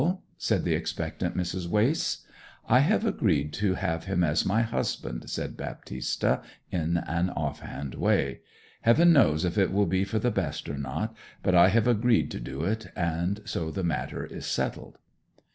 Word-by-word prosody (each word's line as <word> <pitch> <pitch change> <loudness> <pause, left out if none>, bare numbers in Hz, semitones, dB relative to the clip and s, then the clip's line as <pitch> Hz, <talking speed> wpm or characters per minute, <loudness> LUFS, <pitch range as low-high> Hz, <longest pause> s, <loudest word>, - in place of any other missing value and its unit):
said - - +1
the - - +1
expectant - - -3
Mrs. 90 0 -2
Wace. 110 - +1 0.4
'I 125 - +6
have 210 - +3
agreed 75 - +1
to 95 +3 +1
have 80 -3 -2
him 95 -2 +1
as 75 -2 +2
my 110 +5 +3
husband,' - - -3
said - - -4
Baptista, 65 -1 -2 0.3
in 85 -1 0
an 85 +2 0
off - - -3
hand 70 -1 -6
way. - - +1 0.4
'Heaven 165 +9 +6
knows 90 - +4
if 90 +3 0
it 95 - +3
will 100 +1 +3
be 95 0 +1
for 100 +3 -2
the 120 +3 +1
best 95 -9 -2
or 70 0 -4
not. 80 +12 -3 0.3
But 95 - +2
I 90 0 +8
have 115 +3 +3
agreed 120 0 +3
to - - -4
do 65 +4 -5
it, 110 +5 -1
and 85 +4 -1
so 85 -6 -2
the 95 +4 -3
matter 85 -3 -2
is - - -7
settled.' - - -3
95 Hz, 175 wpm, -28 LUFS, 80-110 Hz, 0.4 s, I